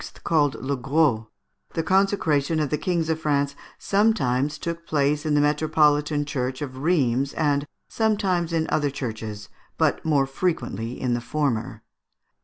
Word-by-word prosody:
(called 150 -4 +2
Le 140 +2 -2
Gros), 135 -3 +1 0.5
the 165 - 0
consecration 165 -6 +2
of 150 -2 -1
the 150 - +1
kings 170 -3 0
of 160 -1 0
France 140 -2 0 0.2
sometimes 150 - +1
took 170 0 -5
place 150 +1 +1
in 150 - +2
the - - +4
metropolitan 150 0 +2
church 130 -3 -3
of 130 -2 -7
Rheims, 140 -4 +1
and 145 -2 0 0.2
sometimes 195 -6 0
in 165 -1 +1
other 145 -2 +2
churches, 110 -6 -6 0.3
but - - +1
more 145 -4 +2
frequently 125 - -3
in 125 -2 0
the 120 - -1
former. 120 -3 -2
145 Hz, 145 wpm, -24 LUFS, 130-160 Hz, 0.5 s, the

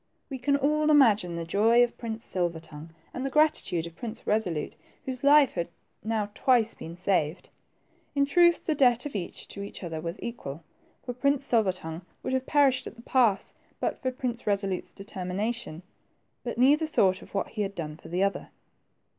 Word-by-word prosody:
We 265 - -4
can 280 +3 +2
all 300 +2 +2
imagine 220 - +5
the 170 0 -4
joy 225 +7 +4
of 240 - -1
Prince 225 -1 -6
Silver 175 -3 -1
tongue, 160 0 -11 0.2
and 255 - -4
the 270 - -1
gratitude 285 - +2
of 170 -1 -10
Prince 230 +2 -7
Resolute, 185 -8 -1 0.3
whose 260 -1 -5
life 285 -1 +6
had 170 -2 -2 0.4
now 215 -1 -1
twice 235 -3 +3
been 165 +1 -9
saved. 180 -3 0 0.7
In 280 0 +3
truth, 345 +4 +4
the 315 - +2
debt 250 -3 +3
of 290 - -5
each 180 -4 -5
to - - -8
the 200 -1 -7
other 160 -2 -4
was 170 +2 -5
equal, 165 - -6 0.4
for 245 - -3
Prince 280 +2 +1
Silver 220 -7 +3
tongue 160 -2 -7 0.2
would - - -2
have 260 0 -1
perished 275 -3 +3
at - - -9
the 235 - -14
pass 235 -7 +2 0.3
but - - -2
for 260 - 0
Prince 250 -3 -4
Resolute's 195 -2 -1
determination; 195 -1 -4 0.6
but 240 -2 -4
neither 290 +6 +4
thought 190 -10 +2
of - - -14
what 195 - -1
he 215 - -4
had 200 -1 -2
done 150 -4 -5
for 160 - -14
the 180 +3 0
other. 200 0 -1
220 Hz, 190 wpm, -28 LUFS, 180-260 Hz, 0.7 s, life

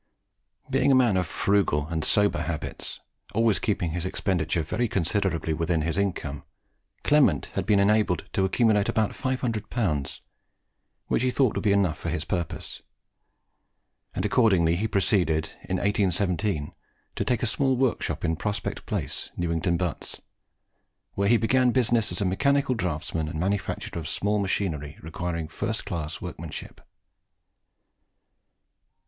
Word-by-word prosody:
Being 135 +1 +3
a - - +6
man 120 -6 +4
of 90 -2 +1
frugal 90 -7 +1
and 80 -2 -1
sober 105 +4 +2
habits, 85 -3 -5 0.3
always 115 -1 +3
keeping 90 -6 -1
his 85 +1 -3
expenditure 85 -3 0
very 120 +10 -1
considerably 90 -3 0
within 80 0 0
his 80 0 -1
income, 90 -8 -2 0.6
Clement 140 - +3
had - - -2
been 105 -2 +4
enabled 100 -2 +2
to 95 - +2
accumulate 105 +1 +3
about 110 -2 +1
500L., 110 - -2 0.9
which - - 0
he 130 - +2
thought 130 -2 +2
would - - -3
be 105 - +3
enough 100 -5 +2
for 85 - -3
his 80 -1 -2
purpose; 85 -2 -4 1.3
and - - -1
he - - +4
accordingly 95 -4 +3
proceeded, 90 -6 +1 0.2
in 95 - +1
1817, 95 -4 0 0.4
to - - -1
take 125 -1 0
a - - +3
small 130 +3 +1
workshop 130 -7 0
in 80 -1 +1
Prospect 105 +5 -3
Place, - - -3
Newington 85 0 0
Butts, 90 -3 -3 0.9
where 100 0 +1
he 120 - +6
began 125 +3 +3
business 120 -3 +2
as - - -3
a - - +1
mechanical 140 +8 +2
draughtsman 80 -6 -2
and 80 0 -4
manufacturer 95 -2 -2
of 80 -1 -5
small 105 +4 0
machinery 80 -7 -2
requiring 85 -1 -4
first 110 +7 -3
class 80 -4 -4
workmanship. - - -7
95 Hz, 140 wpm, -26 LUFS, 85-110 Hz, 1.3 s, a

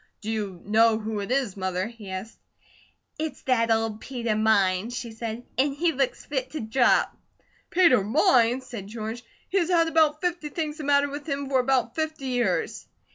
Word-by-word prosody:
"Do 220 +1 -3
you 205 -5 -3
know 220 +2 +4
who 220 -1 -4
it 200 - -5
is, 260 -7 0
Mother?" 185 -1 -2
he 220 -3 -10
asked. 190 +4 -7 0.8
"It's 315 0 -4
that 230 -3 +2
old 225 -1 0
Peter 235 -4 -2
Mines," 215 +1 +2
she 235 -2 -5
said, 225 +1 -5 0.2
"an' 275 +1 +3
he 330 +4 +1
looks 270 -3 -1
fit 260 -3 -3
to 310 - -3
drop." 240 +3 +2 0.5
"Peter 335 - +5
Mines!" 250 - +3
said 230 -6 -7
George. 225 +2 -6 0.3
"He's 365 -3 +1
had 335 -2 +4
about 315 -2 +3
fifty 345 -3 -2
things 305 -1 -3
the 305 - -6
matter 285 0 +4
with 285 +2 -7
him 280 0 -2
for 265 -2 +3
about 250 -2 +1
fifty 315 -4 -3
years." 240 -8 -1
245 Hz, 180 wpm, -26 LUFS, 220-285 Hz, 0.8 s, Peter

